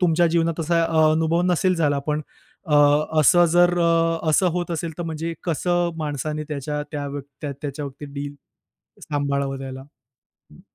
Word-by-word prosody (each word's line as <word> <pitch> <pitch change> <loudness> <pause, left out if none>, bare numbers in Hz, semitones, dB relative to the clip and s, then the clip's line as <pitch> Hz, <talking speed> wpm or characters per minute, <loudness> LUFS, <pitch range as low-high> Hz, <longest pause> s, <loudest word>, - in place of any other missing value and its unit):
तुमच्या 175 -1 +3
जीवनात 165 0 0
असा 165 +1 +1
अ, 160 -1 +3
अनुभव 160 +2 +1
नसेल 185 +2 +2
झाला 145 -4 +1
पण 150 0 +1 0.5
अ, 155 - -3 0.5
असं 175 +5 +6
जर 175 0 +4
अ, 165 -1 +2
असं 180 +4 +3
होत 175 0 -4
असेल 165 0 -3
तर 175 - -2
म्हणजे 165 0 -4
कसं 175 +1 0
माणसाने 150 0 -3
त्याच्या 150 0 -3
त्या 145 -1 -3
व्य 140 0 -5 0.3
त्याच्याबाबतीत 140 0 -7
डील 145 0 -5 0.8
सांभाळावं 140 -1 -1
त्याला? 130 -1 -7 0.7
हं. - - -16
155 Hz, 150 wpm, -23 LUFS, 145-170 Hz, 0.8 s, असं